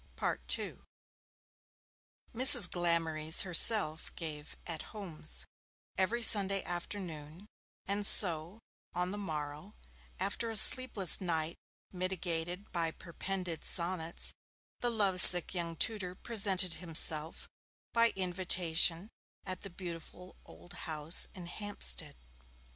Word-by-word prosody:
II - - -5 1.5
Mrs. 245 -5 +7
Glamorys 165 -2 0
herself 180 -3 +1
gave 150 -2 -10
'At 165 -3 -8 0.2
Homes', 165 -6 -4 0.5
every 225 +6 -4
Sunday 195 -3 +5
afternoon, 175 -2 -10 0.4
and 200 +1 -5
so, 175 -2 0 0.4
on 180 +1 -4
the 205 - -8
morrow, 155 +1 -9 0.4
after 200 +5 -6
a 225 - -5
sleepless 220 -5 +6
night 165 -2 -5 0.3
mitigated 180 0 -6
by 165 -2 -4
perpended 175 +1 -9
sonnets, 170 -1 -2 0.5
the 245 - -1
love 200 -5 +1
sick 175 0 +10
young 170 -2 -7
tutor 185 -1 -4
presented 195 -5 -2
himself 160 -2 -2 0.5
by 230 0 +1
invitation 180 -1 0 0.4
at 185 -2 -8
the 200 - -12
beautiful 180 0 -11
old 175 - -18 0.2
house 155 +1 +1
in 180 -2 -12
Hampstead. 195 - -7
180 Hz, 105 wpm, -29 LUFS, 165-195 Hz, 1.5 s, sick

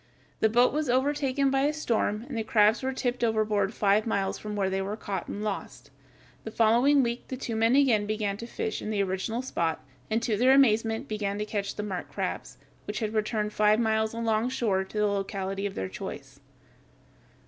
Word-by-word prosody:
The 220 - +3
boat 245 +4 +4
was 300 -2 -1
overtaken 275 +1 +1
by 270 0 +2
a 295 - +2
storm 230 -6 -1
and 275 - -6
the 225 - 0
crabs 215 -1 +3
were 265 0 -1
tipped 250 -2 -2
overboard 215 -3 +1
five 210 0 +2
miles 195 -3 -1
from 210 -1 -5
where 200 -2 0
they 190 0 -1
were 200 +2 -4
caught 195 -5 -4
and 205 - -5
lost. 210 -2 -5 0.5
The - - -5
following 240 +6 +4
week 235 0 -3
the 260 - -5
two 235 -3 -4
men 225 +3 +3
again 240 -7 +3
began 210 -2 -1
to 235 - -7
fish 220 -2 -3
in - - -5
the 205 -2 +1
original 195 +6 -2
spot, 165 - -2 0.2
and 220 - +1
to 225 -2 +1
their 255 +4 +5
amazement 225 -4 +3
began 205 -2 -2
to 210 - -2
catch 205 -2 -3
the 210 - -4
marked 190 -4 -5
crabs, - - -4 0.3
which - - -4
had 220 -2 -2
returned 215 -1 -1
five 210 +1 +3
miles 220 -1 +1
alongshore 225 -3 0
to 200 - -9
the 210 - +3
locality 195 -1 -2
of 195 - -8
their 95 - -3
choice. 95 - -8
220 Hz, 200 wpm, -27 LUFS, 205-240 Hz, 0.5 s, their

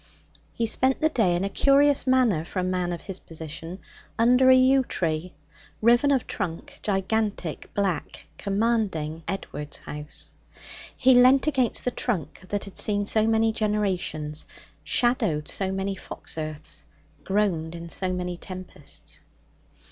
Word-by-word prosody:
He 230 - -1
spent 260 +4 +2
the 315 - +3
day 215 - +2
in 175 - -1
a - - +1
curious 280 +6 +3
manner 250 -11 +3
for 175 - -9
a 185 - +1
man 180 -1 -1
of 170 - -4
his 195 -2 -4
position, 165 +2 -8 0.4
under 250 +3 +5
a 260 - +9
yew 260 +1 +5
tree, 165 - -2 0.4
riven 240 +5 +4
of 270 -4 +2
trunk, 215 - -5
gigantic, 200 -4 -1
black, 195 -4 -2
commanding 200 -7 0
Edward's 150 -6 -5
house. 150 0 -8 0.6
He 260 0 +5
leant 255 +2 +6
against 260 -6 +1
the 250 - +1
trunk 175 - -3
that 205 -1 -1
had 200 - -6
seen 205 -1 +1
so 220 +1 +2
many 225 0 +3
generations, 190 -8 -2 0.4
shadowed 220 -11 +1
so 190 -1 -2
many 195 +1 -2
fox - - -9
earths, 155 -1 -6 0.4
groaned 185 -5 0
in 170 0 -7
so 185 +2 -2
many 180 -1 -3
tempests. 185 -6 -8
200 Hz, 140 wpm, -26 LUFS, 170-240 Hz, 0.6 s, a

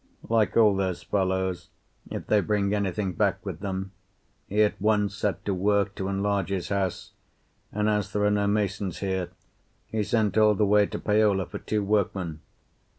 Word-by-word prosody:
Like 110 -1 +2
all 105 -3 +6
those 95 -2 -2
fellows, 95 -2 -1 0.4
if - - -5
they 105 -1 +3
bring 100 -1 0
anything 100 -1 -1
back - - 0
with - - -5
them, 95 -1 -4 0.6
he 105 +2 +3
at 105 - -1
once 105 -1 +2
set 100 -3 -2
to 100 - 0
work 100 +1 +1
to 95 -1 -4
enlarge 100 -1 0
his 95 -3 -3
house, 95 -3 -2 0.6
and 105 0 0
as 105 -2 0
there 105 - 0
are 105 - +3
no 105 0 +1
masons 100 -3 -1
here, 95 -2 -2 0.6
he 110 - -2
sent 110 0 +1
all 105 -1 +5
the 105 - +2
way 105 0 +4
to - - -5
Paola 105 -3 +2
for - - -7
two 105 -1 -1
workmen. 95 -5 -1
100 Hz, 175 wpm, -26 LUFS, 95-105 Hz, 0.6 s, all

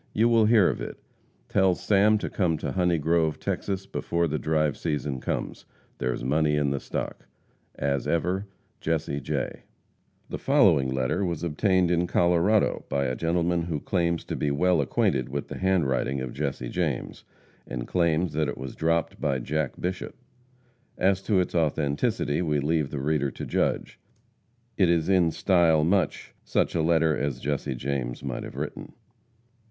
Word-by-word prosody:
You 115 +2 +4
will 115 -2 +5
hear 105 -4 +5
of - - -1
it. - - -6 0.5
Tell 95 -2 +3
Sam 105 +3 +3
to - - -3
come 85 -5 0
to - - -3
Honey 90 -2 +2
Grove, 80 0 +1
Texas, 95 -1 -3
before 85 -3 -1
the 75 0 -2
'drive 75 -2 +1
season' 75 -4 -2
comes. - - -4 0.3
There's 60 -1 -2
money 75 +3 +2
in 75 -2 +1
the 70 - -1
stock. - - -5 0.5
As 70 -2 -1
ever, 90 +5 0 0.3
JESSE 80 -3 -1
J. - - -3 0.7
The - - -5
following 90 - +4
letter 65 +8 0
was 85 -3 -2
obtained 90 +2 +2
in 90 0 +1
Colorado, 90 +5 +2
by 70 - 0
a 65 - -1
gentleman 85 +3 0
who 80 -3 -3
claims 85 0 0
to - - -4
be 75 - -1
well 85 +3 +2
acquainted 65 -2 0
with 70 +1 -4
the - - -6
handwriting 70 -8 +1
of 65 -2 -5
Jesse 70 -4 -3
James, 80 -6 -3 0.4
and - - -5
claims 85 -1 +1
that 75 0 0
it - - -5
was 65 0 -6
dropped 85 +1 -1
by 70 -4 +1
Jack 75 +2 -2
Bishop. 90 +1 -4 0.8
As 95 +1 +2
to 100 -1 +2
its 90 - -1
authenticity, 75 -1 0
we 75 -4 +1
leave 75 0 0
the 75 - -5
reader 70 0 0
to - - -7
judge. - - -1 0.8
It 95 -4 +4
is 85 0 +2
in 90 -3 +4
style 85 -3 +3
much 90 +3 0
such - - 0
a 85 - +1
letter 80 -1 +3
as 70 -3 -2
Jesse 70 -1 -2
James 65 -2 -3
might 65 -3 -3
have - - -8
written. - - -6
80 Hz, 165 wpm, -26 LUFS, 70-90 Hz, 0.8 s, will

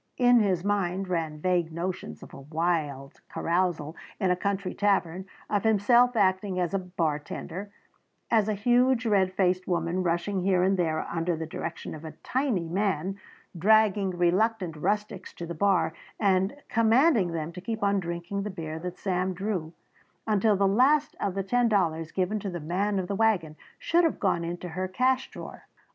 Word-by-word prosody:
In 245 -1 +5
his 190 -5 +1
mind 195 -2 0
ran 160 -4 -2
vague 175 -1 0
notions 175 +3 -5
of - - -13
a - - -10
wild 150 -3 -2
carousal 170 -3 -1 0.2
in 190 -3 +2
a - - +3
country 195 0 -2
tavern, 190 -3 0 0.2
of 205 -2 0
himself 235 +3 +4
acting 190 -2 +1
as 175 0 -1
bartender, 180 +1 -3 0.6
and 220 -2 +3
a 215 - 0
huge 245 +3 +3
red 195 -4 +3
faced 185 -1 +1
woman 175 0 0
rushing 180 +3 -1
here 185 -1 +2
and 190 +1 +3
there 160 -4 0
under 170 0 -2
the 160 0 -4
direction 165 +1 -6
of 155 0 -9
a 160 - -7
tiny 250 - 0
man, 195 +1 -1 0.4
dragging 205 +1 +3
reluctant 180 +1 +1
rustics 205 +3 -2
to 170 - -6
the 170 - -5
bar 190 -1 +2 0.3
and 190 +1 +2
commanding 230 - +3
them 165 -1 -3
to 180 +1 -9
keep 220 +2 -4
on 200 0 +2
drinking 170 +2 -4
the 210 - -4
beer 160 -4 -6
that 180 +1 -6
Sam 185 -1 -1
drew 185 -4 -3 0.5
until 215 0 +3
the 195 0 +2
last 270 +9 +3
of 195 -2 -2
the 195 - -1
ten 240 +4 +2
dollars 165 -6 0
given 195 +3 -1
to 200 - -4
the 175 -2 -5
man 190 +6 -1
of 185 -2 -2
the 200 - -2
wagon 195 -8 +1 0.2
should 345 +1 +2
have 325 - +1
gone 185 -4 +1
into 175 +1 -5
her 185 +3 -3
cash 255 +7 +1
drawer. - - -10
185 Hz, 175 wpm, -27 LUFS, 170-205 Hz, 0.6 s, In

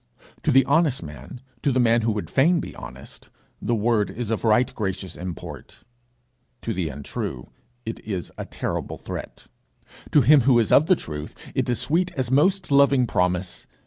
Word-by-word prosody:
To - - 0
the 135 +1 +5
honest 145 - +2
man, 75 +11 -10 0.2
to 145 - +1
the 130 - +1
man 120 -1 +4
who 115 0 +1
would 105 - -4
fain 165 +6 +3
be - - -7
honest, 65 +3 -11 0.3
the 120 - 0
word 110 -1 +1
is 115 -2 -4
of 115 - -1
right 115 +2 +3
gracious 95 -3 -4
import. 90 -1 -8 0.8
To - - -2
the 85 -4 -2
untrue, 65 -2 -5 0.3
it 115 - -5
is 95 -5 -5
a - - -6
terrible - - -4
threat; - - -8 0.6
to 150 - +5
him 140 +3 +6
who 125 0 +4
is 115 -3 +2
of 155 - +6
the 185 - +5
truth, 75 - -6 0.2
it - - -1
is 120 - 0
sweet 165 +8 +1
as 130 -2 -2
most 185 +6 +2
loving 140 -2 +5
promise. 90 -3 -1
120 Hz, 175 wpm, -24 LUFS, 95-140 Hz, 0.8 s, him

